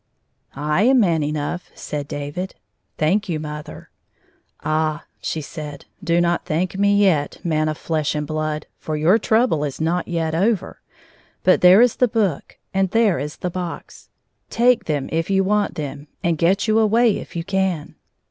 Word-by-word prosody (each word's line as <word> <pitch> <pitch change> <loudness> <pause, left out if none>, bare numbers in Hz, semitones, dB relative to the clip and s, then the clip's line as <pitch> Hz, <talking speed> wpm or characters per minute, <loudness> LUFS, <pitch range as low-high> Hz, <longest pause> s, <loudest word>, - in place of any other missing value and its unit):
" - - -43
I 150 +5 0
am 255 +4 +5
man 170 -7 +2
6nough," 150 +3 -2
said 145 -1 -5
David. 145 +7 -5 0.2
" - - -50
Thank 190 +6 +1
you, 160 -3 -1
mother." 150 0 -8 0.4
" - - -42
Ah! 155 0 0
" - - -45
she 160 - -3
said, 150 -1 -8
" - - -24
do 170 -1 +2
not 175 0 +1
thank 175 +4 -1
me 200 +1 +3
yet, 180 -8 +2
man 155 -2 +1
of 155 - -3
flesh 155 -2 -1
and 150 0 -2
blood, 155 0 -3
for 155 -1 -3
your 175 +9 +4
trouble 220 -11 +2
is 145 -3 -4
not 170 +3 0
yet 165 -2 -1
over. 200 +5 0 0.6
But 185 - +4
there 180 +4 +8
is 245 - +2
the 250 - +4
book, 210 - -1 0.2
and 195 -1 +1
there 215 - +2
is 150 +2 -5
the 180 - -3
box. 180 -1 -7 0.4
Take. 240 +1 +3
H5 - - -22
them 145 -3 -1
if 165 +2 -1
you 195 0 +3
want 205 +1 +1
them, 145 -1 -6 0.2
and 170 -1 +2
get 185 +7 +2
you 220 +1 +3
away 225 +1 +3
if - - -11
you 170 - -2
can." 190 -4 -1
170 Hz, 190 wpm, -21 LUFS, 155-195 Hz, 0.6 s, there